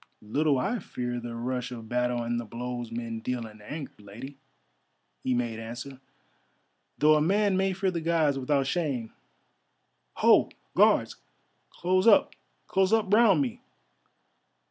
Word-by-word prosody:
"Little 145 +6 +1
I 215 - -1
fear 120 -8 -4
the 120 -1 -7
rush 125 +1 -3
of 115 -2 -8
battle 125 0 0
and 120 0 -1
the - - -4
blows 120 +1 -6
men 115 -1 -4
deal 120 +1 -3
in 105 -1 -13
anger, 145 +6 -7
Lady," 120 +7 -10 0.8
he 130 - +1
made 120 -2 -2
answer, 120 +4 -8 1.0
"though 150 +1 +5
a 150 - +3
man 200 +4 +2
may 190 0 +1
fear 190 0 0
the 170 -2 -3
Gods 160 -4 +1
without 135 +1 +1
shame. 135 -7 -2 1.0
Ho, - - +5 0.3
Guards! - - +4 0.5
close 185 +3 +1
up, 210 - +5 0.3
close 190 0 +2
up 220 -3 +2
round 210 -9 +5
me! 125 - -5
130 Hz, 145 wpm, -28 LUFS, 120-170 Hz, 1.0 s, though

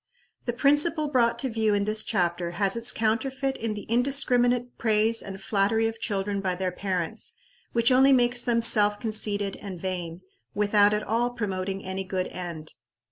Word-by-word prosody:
The 240 - -1
principle 295 +4 +2
brought 235 -3 +2
to 265 - -1
view 220 -2 +1
in 200 - +1
this 215 +1 +1
chapter 175 -1 -1
has 200 0 +1
its 230 0 +2
counterfeit 265 +5 -1
in 225 -2 -3
the 205 - -7
indiscriminate 245 0 +1
praise 225 0 +2
and 195 -1 -8
flattery 205 +3 +1
of 225 0 -6
children 200 -2 -2
by 185 -2 -1
their 185 0 -2
parents, 180 -2 -3 0.4
which 235 +2 +3
only 265 +2 +5
makes 245 -2 +3
them 235 -1 +1
self 205 -2 +4
conceited 210 -3 -1
and 190 -4 -8
vain, 175 -2 -5 0.3
without 205 0 +3
at 210 - -2
all 230 +3 0
promoting 195 -4 -4
any 190 +1 -4
good 185 -1 -3
end. 170 -4 -7
215 Hz, 170 wpm, -26 LUFS, 195-240 Hz, 0.4 s, only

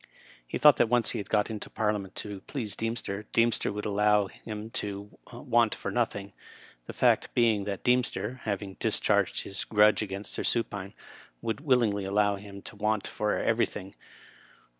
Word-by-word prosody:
He - - -3
thought - - +7
that 115 - +3
once 120 -1 +3
he - - -3
had 100 - -6
got 105 +1 +1
into 105 -2 -6
Parliament 105 -3 -2
to 100 -2 -6
please 110 -9 -3
Deemster, 110 -3 -3
Deemster 115 -2 +2
would 105 0 -5
allow 105 0 +3
him 110 +2 -8
to 100 -1 -5 0.2
want 120 -2 +1
for - - -5
nothing; 100 -5 -1 0.5
the - - -5
fact - - +2
being 110 -4 +3
that 100 -2 -4
Deemster, 125 +1 +1
having 100 -2 -3
discharged - - +2
his 95 - -4
grudge 105 0 +4
against 100 -1 -4
Sir - - -2
Supine, 105 -4 -2 0.5
would 115 +4 -2
willingly 120 -8 +2
allow 100 +1 +2
him 100 0 -11
to - - -10
want 105 0 0
for 105 0 -1
everything. 105 -4 -1
105 Hz, 160 wpm, -28 LUFS, 100-115 Hz, 0.5 s, thought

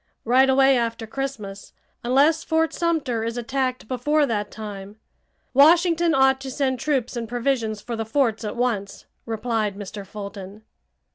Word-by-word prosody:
"Right 260 +3 +4
away 270 0 +5
after 230 -1 -2
Christmas, 220 -6 -6 0.3
unless 285 +6 +3
Fort 320 0 +1
Sumter 310 -10 -1
is 230 +1 -3
attacked 255 0 -2
before 290 +5 +1
that 210 -5 -2
time. 205 -2 -8 0.6
Washington 335 +3 +5
ought 265 0 +4
to 270 - -6
send 260 -1 -1
troops 265 -4 -1
and 230 -2 -4
provisions 235 -3 -1
for 235 - -5
the 225 - -2
forts 225 -1 0
at 210 - -4
once!" 215 -5 -2 0.2
replied 220 -2 -1
Mr. 205 0 -7
Fulton. 200 +1 -9
245 Hz, 145 wpm, -23 LUFS, 215-275 Hz, 0.6 s, away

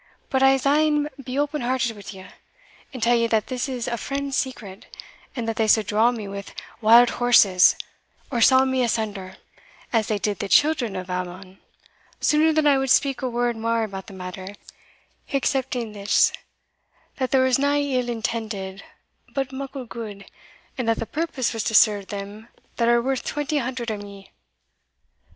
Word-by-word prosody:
But 265 - +1
I'se 270 0 +4
een 295 +1 +2
be 255 +1 -5
open 295 +1 -1
hearted 245 -2 -1
wi' 200 -1 -10
you, - - -12 0.7
and 255 -4 -6
tell 240 +1 +4
you 230 0 +2
that 220 -2 +1
this 255 +1 -3
is 250 -3 -4
a 235 - -2
friend's 275 +1 -3
secret, 215 -8 -4 0.5
and 235 -3 -3
that 225 - -2
they 220 - +1
suld 215 0 +4
draw 215 +4 +3
me 220 -4 -6
wi' 200 0 -6 0.4
wild 230 +2 +7
horses, 200 -7 +6 0.6
or 240 -3 -1
saw 260 +3 +6
me 260 -1 0
asunder, 215 -5 -2 0.6
as 225 -2 +2
they 215 - 0
did 205 0 -2
the 200 - -3
children 245 - +3
of 185 0 -5
Ammon, 185 +1 -6 0.6
sooner 310 +1 +3
than 310 -1 +1
I 280 -2 +4
would 270 0 -1
speak 275 0 +2
a 260 - -1
word 240 0 -1
mair 230 0 0
about 195 -3 -6
the - - -11
matter, 185 +1 -8 0.8
excepting 260 -4 -1
this, 205 -1 +2 0.8
that 260 -2 -1
there 265 -1 +3
was 260 0 +2
nae 285 +1 +2
ill 255 -4 -1
intended, 220 -4 -4 0.5
but 270 -1 -2
muckle 270 0 -6
gude, 215 -4 -8 0.5
and 235 -2 0
that 225 - +2
the - - -3
purpose 290 -4 -2
was 225 -2 -2
to 220 - -1
serve 205 -4 +4
them 205 +2 -7 0.3
that 235 - +1
are 235 0 +3
worth 265 0 -1
twenty 295 0 -2
hundred 245 -2 -3
o' 215 - -3
me. 200 -1 -12
235 Hz, 175 wpm, -23 LUFS, 205-265 Hz, 0.8 s, wild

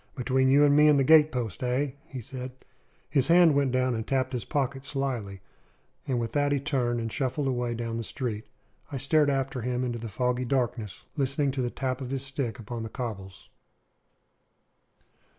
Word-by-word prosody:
"Between 130 +1 +1
you 145 +2 +6
and 145 0 +4
me 150 +1 +6
and 150 -1 +6
the 135 - +3
gatepost, 135 - +4
eh?" 130 +3 0 0.2
he 135 - -8
asked. 130 +1 -8 0.4
His 135 -4 +2
hand 170 -2 +6
went 140 -2 +2
down 130 0 +1
and 110 -1 -4
tapped 130 -1 0
his 125 - -3
pocket 135 -2 -2
slily, 125 -9 -3 0.7
and 125 -3 0
with 115 -1 -3
that 145 -1 +1
he 140 - +2
turned 130 -4 0
and 115 -1 -3
shuffled 135 0 -1
away 120 -2 -1
down 115 0 -3
the 115 - -3
street. 110 -3 -4 0.4
I 140 - -3
stared 145 +3 +3
after 135 -2 -1
him 125 +1 -1
into 120 -2 -2
the 115 0 -6
foggy 125 +3 0
darkness, 120 -6 -2
listening 140 0 +1
to 135 -1 -2
the 120 - 0
tap 130 +1 -3
of 130 - -5
his 135 0 -3
stick 135 -4 -3
upon 115 0 -6
the 110 - -5
cobbles. 100 -7 -7
130 Hz, 185 wpm, -27 LUFS, 120-140 Hz, 0.7 s, you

